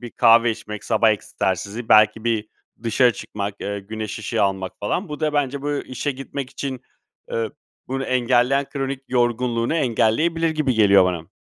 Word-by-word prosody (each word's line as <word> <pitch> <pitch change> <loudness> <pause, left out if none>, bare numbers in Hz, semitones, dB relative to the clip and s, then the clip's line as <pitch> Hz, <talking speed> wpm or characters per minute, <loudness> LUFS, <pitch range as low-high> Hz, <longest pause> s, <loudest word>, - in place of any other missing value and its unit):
bir 120 -2 -8
kahve 115 +1 +5
içmek, 105 -1 -7
sabah 110 -1 +3
egzersizi, 100 +2 -3
belki 110 +1 +5
bir 110 -2 0 0.3
dışarı 120 +1 +3
çıkmak, 100 0 -5
eee, 100 0 -3
güneş 110 +1 -6
ışığı 105 - -1
almak 95 -1 -1
falan 175 - -2
Bu 150 0 -6
da 155 -1 0
bence 140 -1 -1
bu 145 - -2 0.2
işe 130 +3 -3
gitmek 135 0 -6
için, 130 -1 -5 0.5
eee, 115 -2 -1 0.4
bunu 135 +1 -2
engelleyen 130 +2 +2
kronik 135 -1 -3
yorgunluğunu 120 +1 0
engelleyebilir 155 +5 +1
gibi 155 -5 0
geliyor 100 -3 +6
bana. 90 0 -3
120 Hz, 155 wpm, -22 LUFS, 105-135 Hz, 0.5 s, geliyor